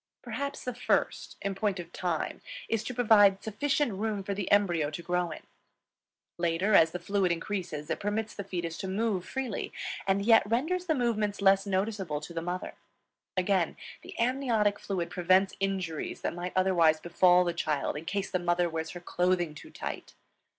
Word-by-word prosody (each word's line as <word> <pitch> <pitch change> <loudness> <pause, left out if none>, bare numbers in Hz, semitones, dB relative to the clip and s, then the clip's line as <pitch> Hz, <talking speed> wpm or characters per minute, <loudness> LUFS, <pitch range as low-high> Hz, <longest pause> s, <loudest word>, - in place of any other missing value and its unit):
Perhaps 280 +4 -4
the 250 - -3
first, 245 - -1
in 200 0 -1
point 195 -1 -1
of 170 -1 -8
time, 175 -4 -2 0.3
is 225 -1 0
to - - -3
provide 205 -5 +5
sufficient 275 +3 0
room 205 0 -2
for 200 - -2
the 195 -1 -3
embryo 175 -7 +3
to 155 +3 -7
grow 180 0 0
in. 155 - -8 1.0
Later, 170 +5 +1
as 165 -4 +7
the 180 - -4
fluid 185 +1 0
increases, 170 -3 -3
it - - -2
permits 210 +2 -2
the 200 - -5
fetus 170 -3 -4
to 190 - -4
move 195 -1 0
freely, 260 0 -4 0.4
and 195 +1 +2
yet 225 0 +7
renders 335 +10 0
the 315 - +2
movements 220 -5 0
less 195 0 +4
noticeable 190 -5 -1
to 150 +3 -9
the 165 - -3
mother. 180 +2 -4 0.6
Again, 185 -2 +1 0.2
the - - -11
amniotic 235 -4 +1
fluid 175 -4 -3
prevents 185 +2 +3
injuries 190 -5 -2
that - - -2
might 175 +1 -5
otherwise 175 -4 +4
befall 180 +2 +4
the 175 -1 -1
child 150 -4 -1
in 150 +2 -6
case 195 +2 -2
the 185 - +1
mother 175 0 +1
wears 160 -1 -3
her - - -10
clothing 175 -2 0
too 150 - -11
tight. - - -6
190 Hz, 180 wpm, -29 LUFS, 175-210 Hz, 1.0 s, as